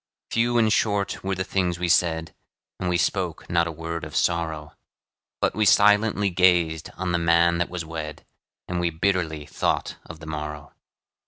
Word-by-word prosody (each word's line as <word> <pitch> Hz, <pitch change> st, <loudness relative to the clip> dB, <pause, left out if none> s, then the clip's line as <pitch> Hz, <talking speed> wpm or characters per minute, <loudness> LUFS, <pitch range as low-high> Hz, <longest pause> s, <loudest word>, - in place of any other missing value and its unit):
Few 120 Hz, +1 st, +2 dB
and 110 Hz, -2 st, +3 dB
short 100 Hz, -2 st, 0 dB
were 95 Hz, 0 st, -1 dB
the 95 Hz, -, -2 dB
things 90 Hz, -2 st, -1 dB
we 90 Hz, 0 st, -2 dB
said, 80 Hz, -1 st, +1 dB, 0.5 s
And 90 Hz, -, -1 dB
we 90 Hz, -, +2 dB
spoke 90 Hz, -1 st, -1 dB
not 85 Hz, -1 st, +2 dB
a -, -, -3 dB
word 85 Hz, +1 st, -5 dB
of 75 Hz, -1 st, -8 dB
sorrow, 80 Hz, -3 st, -1 dB, 0.7 s
But -, -, +1 dB
we 110 Hz, -, +1 dB
silently 105 Hz, 0 st, +4 dB
gazed 85 Hz, -3 st, +2 dB
on 90 Hz, -1 st, -2 dB
the 85 Hz, -, +1 dB
man 85 Hz, 0 st, +3 dB
that 85 Hz, -, 0 dB
was 90 Hz, -2 st, -5 dB
wed, 80 Hz, -2 st, -7 dB, 0.4 s
And 90 Hz, 0 st, -2 dB
we 85 Hz, -1 st, +1 dB
bitterly 80 Hz, -3 st, -1 dB
thought -, -, -2 dB
of 80 Hz, -1 st, -10 dB
the 80 Hz, -, -11 dB
morrow. 75 Hz, -1 st, -6 dB
85 Hz, 175 wpm, -24 LUFS, 80-95 Hz, 0.7 s, silently